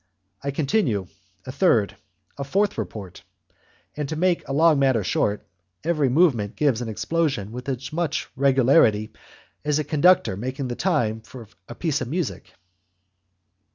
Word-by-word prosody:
I 140 - -2
continue; 135 - 0 0.4
a 130 - -5
third, 120 - +2 0.4
a 140 - -4
fourth 200 +9 0
report, 100 -3 -7 0.7
and, 150 -2 -4
to 155 - -3
make 175 -2 +1
a - - -5
long 155 +1 +4
matter 130 -6 +2
short, 100 +2 0 0.4
each 170 - +3
movement 135 - +2
gives 135 -6 +1
an 120 - -4
explosion 135 -3 -1
with 125 +3 -6
as 130 +2 -4
much 160 -2 -1
regularity 130 -5 +3 0.5
as 150 0 +1
a 155 - 0
conductor 155 - +3
making 130 +5 -4
the 120 - -3
time 120 - 0
for 115 0 -12 0.2
a 120 - -7
piece 160 -3 -1
of 130 - -3
music! 135 - -4
135 Hz, 150 wpm, -23 LUFS, 115-155 Hz, 0.7 s, long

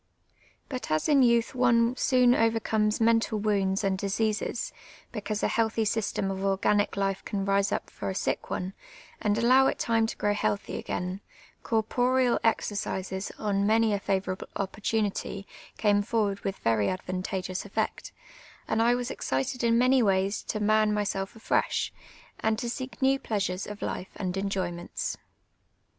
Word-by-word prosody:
But 255 -3 -5
as 155 0 +1
in 290 -3 +5
youtli 235 -1 +3
one 240 -1 +3
soon 250 -2 +4
overcomes 225 -2 +1
mental 225 -1 +3
wounds 200 -2 +1
and 190 -1 0
diseases, 210 +2 -1 0.4
because 215 -1 -3
a - - +4
healthy 225 -1 +1
system 205 -2 -1
of 190 - -4
orjj^anic 195 +1 +1
life 195 -1 -1
can 195 -1 -3
rise 200 0 +2
up - - -2
for - - -5
a 190 - -3
sick - - -2
one, 185 +1 -3 0.5
and 210 -1 +1
allow 255 +3 +5
it - - 0
time 225 -1 +2
to - - -6
jj^row 205 0 +1
healthy 205 -1 -1
again, 180 +2 -4 0.4
cor 225 -2 +1
poreal 250 +2 +2
exercises, 195 -3 -1
on 200 -2 0
many 220 0 +3
a 200 - 0
favourable 195 -1 -2
oj)portunity, 200 0 -2 0.3
came 205 -1 +3
for 225 +2 0
ward 200 -1 -2
with 195 0 -3
ver}' 115 -2 +1
advantageous 185 - -2
cHeet; 215 +2 -3 0.6
and 220 +1 +1
I 240 +1 +4
was 245 0 -3
excited 135 - -2
in 230 0 +4
many 255 +2 +4
ways 195 -1 +1
to 215 - -2
man 215 0 +3
myself 200 -1 -2
afresh, 225 - 0 0.5
and 220 0 +1
to 240 0 -3
seek 255 0 -5
new 270 +1 +4
pleasures 195 -5 -2
of 210 0 -7
life 185 - -4
and 185 -2 -3
enjo>inents. 185 -3 -3
210 Hz, 155 wpm, -28 LUFS, 195-230 Hz, 0.6 s, in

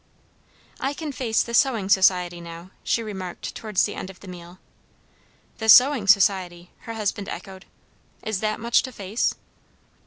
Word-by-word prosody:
"I 275 +2 -2
can 310 -1 -5
face 235 -5 0
the 235 - -8
Sewing 235 -6 +2
Society 180 -3 +3
now," 170 +2 -10
she 230 - 0
remarked 190 -4 -6
towards 215 -4 -1
the - - -4
end 185 - -6
of 190 - -13
the 200 - -13
meal. 175 0 -11 1.0
"The 220 0 -2
Sewing 250 -3 +7
Society!" 185 -3 +2 0.2
her 230 - -5
husband 205 -2 -3
echoed. 190 -1 -8 0.6
"Is 220 -3 -2
that 215 0 -2
much 235 +1 +3
to 260 - -7
face?" 205 0 -2
200 Hz, 155 wpm, -24 LUFS, 185-230 Hz, 1.0 s, Sewing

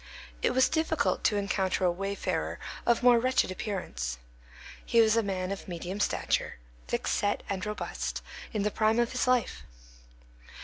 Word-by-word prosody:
It - - +1
was 260 - +5
difficult 320 -2 0
to 210 - +3
encounter 190 -2 0
a 175 - +4
wayfarer 195 +3 -2 0.3
of 235 0 +3
more 245 -1 +7
wretched 255 -5 +2
appearance. 125 - -4 0.7
He 235 - +2
was 220 -1 +5
a 230 - +4
man 190 -2 -2
of 195 - -5
medium 180 +2 -5
stature, - - 0 0.3
thickset 205 0 0
and 190 -2 -3
robust, 210 0 -4 0.3
in 210 -3 -1
the 210 - +1
prime 220 +2 +2
of 240 +1 +1
life. 250 -3 +1
210 Hz, 145 wpm, -29 LUFS, 190-235 Hz, 0.7 s, more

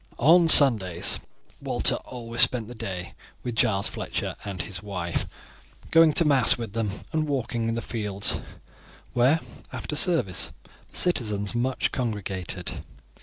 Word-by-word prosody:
On 165 +5 +4
Sundays 105 - +6 0.4
Walter - - +3
always 115 -1 -5
spent 120 -4 +3
the 120 - -9
day 95 -6 -7 0.3
with 120 - -4
Giles 100 -3 +1
Fletcher - - -5
and 100 -3 -7
his 95 -4 -6
wife, 90 -5 -4 0.6
going 165 -1 +5
to 170 - +3
mass 135 -5 +4
with 115 -4 -7
them 115 -2 -2 0.2
and 155 -1 -1
walking 120 -5 -2
in 115 - -2
the 115 - -4
fields, 105 -4 -2 0.7
where, 130 +6 +2 0.3
after 150 - -6
service, 150 - +2 0.4
the - - -5
citizens 105 - 0
much 125 +2 -1
congregated. 95 -6 -5
115 Hz, 135 wpm, -24 LUFS, 100-130 Hz, 0.7 s, Sundays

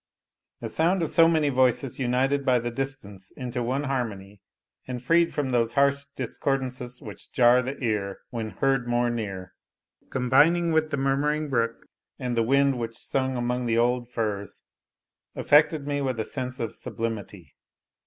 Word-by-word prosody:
The - - -4
sound 170 +3 +1
of 160 - -2
so 165 -1 +6
many 155 -3 +2
voices 130 -1 +1
united 135 +3 +1
by 130 -2 +3
the 120 0 -2
distance 115 -8 -6
into 125 -1 -4
one 130 +4 -1
harmony, 105 -8 -4 0.5
and 125 -1 -4
freed 165 +7 +3
from 140 -3 -2
those 115 -2 +1
harsh 140 0 +2
discordances 125 -1 -3
which 105 -3 -10
jar 125 0 +5
the 130 +2 -5
ear 105 -4 -1
when 115 -3 -3
heard 135 +1 0
more 120 0 +1
near, 100 -5 -5 0.6
combining 145 +7 +3
with 160 -1 +2
the 140 - -2
murmuring 145 +3 0
brook, 115 -2 -1 0.3
and 125 -1 -3
the 115 - +2
wind 135 +2 +2
which 115 -1 -4
sung 130 -1 -1
among 125 0 -1
the 115 0 +1
old 120 +1 +1
firs, 105 -4 -3 0.7
affected 150 0 +3
me 145 0 -1
with 130 -4 -2
a 110 - -1
sense 130 -1 -5
of 115 -2 -3
sublimity. 105 - -5
125 Hz, 160 wpm, -26 LUFS, 115-140 Hz, 0.7 s, so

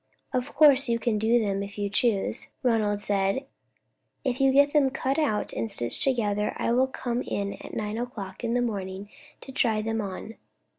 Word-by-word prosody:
"Of 255 +1 -2
course 285 -3 +6
you 235 - +2
can 230 -2 0
do 225 +3 +3
them, 200 -3 -1
if 200 +1 -7
you 205 0 -1
choose," 205 0 0 0.2
Ronald 215 -4 +2
said. 200 +6 0 0.8
"If 260 -1 -1
you 270 0 +5
get 285 +2 +4
them 290 -3 +4
cut 270 +2 -1
out 250 -9 0
and 225 - -2
stitched 120 - -2
together, 210 -6 0
I - - 0
will 255 +2 +3
come 245 -2 -3
in 200 -4 -3
at - - -8
nine 210 +1 -3
o'clock 220 -5 -6
in 235 0 0
the 245 - +2
morning 195 -3 -4 0.3
to 265 - -9
try 235 -5 +2
them 225 0 -1
on. 200 +3 -6
225 Hz, 190 wpm, -27 LUFS, 205-255 Hz, 0.8 s, course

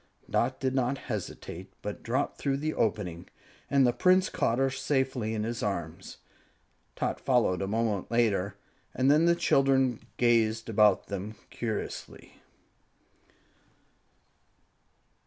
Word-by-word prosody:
Dot 130 +2 0
did 130 -2 -1
not 130 +1 0
hesitate, 95 -5 -6
but 105 0 -5
dropped 130 +5 -2
through 135 -1 0
the 155 +2 -2
opening, 95 -6 -2 0.4
and 140 -2 +4
the 120 - +3
Prince 185 +4 +3
caught 115 - 0
her 135 0 +2
safely 130 -4 -1
in 105 - -2
his 115 +1 -3
arms. 85 -5 -4 0.8
Tot - - -2
followed 120 -9 +2
a 95 - -1
moment 110 -2 -1
later, 105 -5 +1 0.4
and 130 +2 +3
then 155 +3 +4
the 170 - +5
children 135 -6 +2 0.2
gazed 115 -2 +2
about 105 -1 +4
them 100 +2 -5 0.2
curiously. 110 -3 -6
115 Hz, 120 wpm, -29 LUFS, 105-135 Hz, 0.8 s, the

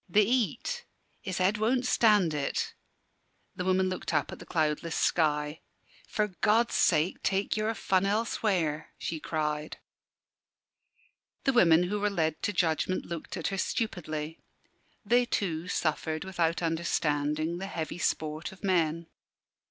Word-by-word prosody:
"The 205 +3 +5
heat 260 - -1 0.3
his 190 -2 -4
head 195 +3 +2
won't 245 +3 +2
stand 210 -9 +4
it." 145 -2 -1 0.8
The 180 - -3
woman 185 0 +2
looked 185 0 -3
up - - +1
at - - -8
the - - -11
cloudless 160 0 0
sky. 150 -1 +1 0.5
"For 210 -1 0
God's 225 +3 +3
sake 155 +5 +2
take 195 +1 0
your 215 +1 0
fun 190 -1 +1
elsewhere!" 195 -7 0
she 160 - -4
cried. 150 -1 -2 1.7
The 270 - +2
women 175 -7 +6
who 205 +4 -1
were 210 +1 +1
led 160 -5 -1
to - - 0
judgment 175 0 0
looked 170 -2 -6
at - - -1
her 195 -1 -3
stupidly. 160 -9 -3 0.7
They 240 +4 +4
too 180 -8 -2
suffered, 155 -1 -1
without 175 -2 0
understanding, 160 -1 0
the 195 - -4
heavy 165 -3 -4
sport 155 -1 -1
of 190 - -16
men. 170 -3 +1
175 Hz, 135 wpm, -29 LUFS, 155-205 Hz, 1.7 s, women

